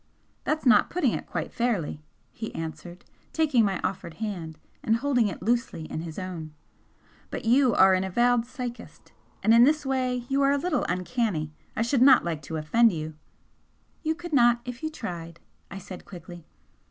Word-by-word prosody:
"That's 310 -1 -1
not 250 - +5
putting 360 - +1
it - - -4
quite - - -4
fairly," 210 -11 -1 0.3
he 220 - -7
answered, 175 +2 -7 0.3
taking 300 -8 +3
my 195 -2 0
offered 185 -3 -3
hand 175 -7 -5 0.2
and 225 - +2
holding 245 -2 +2
it 180 -3 -6
loosely 235 -6 0
in 155 - -3
his 165 -2 -7
own 170 -5 -6 0.7
"But - - -6
you 245 0 +4
are 190 0 +6
an 185 0 +2
avowed 240 +5 +2
psychist, 250 -2 -8 0.3
and 225 - +5
in 235 +1 +8
this 295 +2 +3
way 255 -2 -1
you 275 +1 +1
are 275 0 +4
a - - +2
little 305 +1 -1
'uncanny.' 180 - -1 0.2
I 225 - +1
should 235 +2 +1
not 260 -5 +7
like 165 -3 -2
to 160 - -5
offend 225 +10 +4
you 160 -2 -5 0.5
" - - -40
"You 315 0 0
could 345 0 -8
not 240 -3 +5
if 250 +1 -7
you 315 - -2
tried," 170 - -7 0.3
I 195 - -7
said, 190 -1 -9
quickly. 175 -2 -11
225 Hz, 180 wpm, -26 LUFS, 175-255 Hz, 0.7 s, in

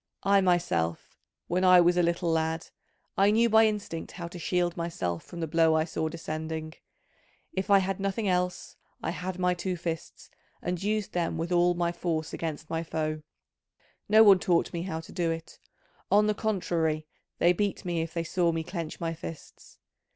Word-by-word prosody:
I 200 0 +4
myself, 170 - 0 0.3
when 180 +2 0
I 185 -1 +8
was 175 0 +4
a 180 - +3
little 170 0 +1
lad, 160 0 -1 0.5
I 200 +1 +6
knew 230 +2 +4
by 220 0 +7
instinct 205 -6 -4
how 170 -2 -6
to 175 - -9
shield 175 0 0
myself 95 - -3
from 170 - -9
the 165 - -1
blow 160 0 +3
I 155 - +3
saw 160 -1 -2
descending: 155 -1 -5 0.8
if 190 +2 -3
I 200 - +7
had 195 0 -1
nothing 200 +2 -1
else, 180 -1 -1 0.3
I - - -1
had 180 +1 -5
my 180 -1 +2
two 180 +1 -3
fists, 165 -1 -6 0.3
and 180 -1 -3
used 210 0 -1
them 175 -2 -1
with 165 +2 -3
all 175 0 +3
my 170 0 0
force 165 -2 -3
against 155 -1 -4
my 165 0 -2
foe: 155 -1 -3 0.9
no 215 +1 +8
one 200 -3 +7
taught 175 -2 +1
me 170 - -2
how 160 -3 -4
to 165 - -13
do 170 -2 -1
it, 165 0 -5 0.5
on 210 +1 +5
the 210 - +2
contrary 170 -7 -1 0.3
they 175 +1 +4
beat 200 +1 -2
me 170 -2 -1
if 165 0 -4
they 170 - 0
saw 170 0 +1
me 165 -1 -2
clench 165 -2 -5
my 165 -1 -2
fists. 165 -1 -10
175 Hz, 190 wpm, -28 LUFS, 165-185 Hz, 0.9 s, I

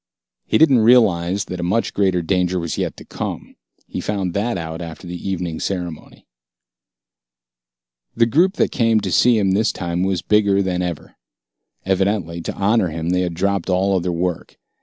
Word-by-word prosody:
He - - +3
didn't 140 -6 +5
realize 100 -6 +3
that 90 - -6
a - - -3
much 100 +7 0
greater 95 -3 +1
danger 90 +1 0
was 85 -1 -3
yet - - -3
to - - -12
come. - - -6 0.3
He - - -5
found 95 -4 -2
that 110 +2 -1
out 80 0 -5
after 85 +1 -8
the 90 +2 -6
evening 90 -4 -3
ceremony. 90 -5 -5 1.9
The 115 - +4
group 170 - +2
that - - +1
came 115 -3 +2
to 95 -2 -3
see 120 +6 +4
him 100 -3 +2
this 110 +4 +2
time 85 0 -3
was 95 -2 -1
bigger 100 -2 +3
than 90 -1 -1
ever. 90 -3 -5 0.7
Evidently, 95 -3 0
to - - -4
honor 100 0 +2
him 80 +1 -3
they 90 0 +1
had 90 -2 -2
dropped 100 0 -1
all 95 +1 +2
other 90 -1 0
work. 85 0 -3
95 Hz, 175 wpm, -20 LUFS, 85-100 Hz, 1.9 s, didn't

